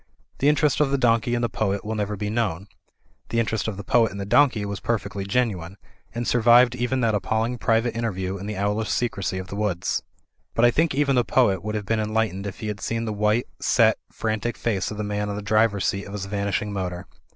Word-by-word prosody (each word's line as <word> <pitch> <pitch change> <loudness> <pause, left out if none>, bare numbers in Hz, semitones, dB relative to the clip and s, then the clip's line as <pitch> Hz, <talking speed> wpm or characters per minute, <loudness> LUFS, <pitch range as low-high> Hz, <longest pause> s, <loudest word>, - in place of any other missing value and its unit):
The 140 - +4
interest 150 -1 +2
of 150 -2 +3
the 140 - +1
donkey 120 -1 +2
in 120 - -1
the - - +3
poet 105 -2 -2
will 110 - -2
never 105 -1 -2
be 105 +1 -3
known. 100 -6 -1 0.6
The 115 - 0
interest 110 -2 -1
of 105 -3 -3
the 100 - -6
poet 115 +2 +3
in 100 - -8
the 100 - -4
donkey 115 -1 +3
was 100 -1 -4
perfectly 100 -4 -2
genuine; 100 -5 -1 0.4
and 120 0 -2
survived 120 +1 +5
even 125 +1 -1
that 115 -2 +2
appalling 110 +4 -1
private 115 +1 +1
interview 95 -5 -2
in 100 - -6
the 105 -2 -4
owlish 105 +2 -1
secrecy 100 -6 -1
of 95 0 -6
the 100 - -5
woods. 100 -4 -1 0.5
But 115 - +4
I 120 - +6
think 160 +2 +1
even 140 -1 +2
the 125 - +4
poet 100 -8 +2
would 105 +1 -3
have 105 -1 -3
been 110 +3 0
enlight 110 -1 0
ened 100 +2 -5
if 100 - -8
he 110 - -3
had 105 -1 -4
seen 115 0 -2
the 110 - -2
white, 105 +3 +1
set, - - +3
frantic 110 +1 -2
face 100 -5 -1
of 105 - -6
the 105 - -2
man 105 0 -2
on 100 - -3
the 105 - -4
driver's 105 -1 +2
seat 100 0 -1
of 100 - -9
his 100 -2 -4
vanishing 100 +1 -2
motor. 90 -1 -4
105 Hz, 235 wpm, -24 LUFS, 100-120 Hz, 0.6 s, I